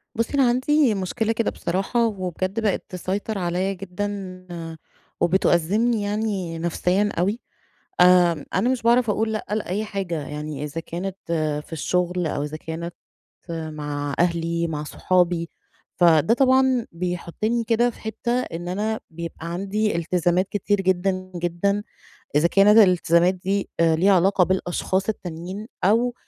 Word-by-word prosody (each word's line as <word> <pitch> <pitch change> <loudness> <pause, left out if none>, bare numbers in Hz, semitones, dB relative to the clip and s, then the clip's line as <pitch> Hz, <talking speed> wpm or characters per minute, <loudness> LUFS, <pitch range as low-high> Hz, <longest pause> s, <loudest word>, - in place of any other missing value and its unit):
بُصّي، 230 +5 -1
أنا 270 -3 +4
عندي 260 0 +3
مشكلة 205 +3 -1
كده 230 -1 0
بصراحة، 195 +7 0
وبجد 185 0 -3
بقِت 210 -3 0
تسيطر 195 +3 -3
عليَّا 180 +2 -1
جدًا 195 -1 -5 0.8
وبتأزِّمني 190 +6 +2
يعني 205 -5 -2
نفسيًا 180 +4 +1
أوي. 200 +7 0 0.6
آآ، 180 -4 +5
أنا 200 +6 +2
مش 255 -2 0
باعرف 235 0 +3
أقول 220 +1 0
لأ 215 - -3
لأي 210 -1 -1
حاجة، 180 -8 -4
يعني 150 -1 -5
إذا 150 +2 -4
كانت 180 +3 -5 0.5
في - - -21
الشغل، 180 +2 0
أو 145 -2 -2
إذا 150 +1 -4
كانت 165 +2 -6 0.5
مع 150 -3 -4
أهلي، 170 -1 +1
مع 150 -2 -4
صحابي. 175 +1 +1 0.5
فده 170 +3 +5
طبعًا 260 -2 +3
بيحطني 180 +7 -2
كده 235 +2 +2
في - - -16
حتّة 220 +2 -4
إن 175 -5 -6
أنا 215 +4 -2
بيبقى 165 0 -7
عندي 200 +3 -1
التزامات 175 +2 +1
كتير 205 0 0
جدًا، 185 0 0
جدًا، 175 +4 0 0.5
إذا 150 +3 +5
كانت 200 +4 +5
الالتزامات 180 -3 +5
دي 190 +2 -2
ليها 165 +4 +4
علاقة 190 +1 +4
بالأشخاص 190 +1 -1
التانيين، 185 +1 -5 0.2
أو 230 +6 +3
185 Hz, 130 wpm, -23 LUFS, 170-210 Hz, 0.8 s, آآ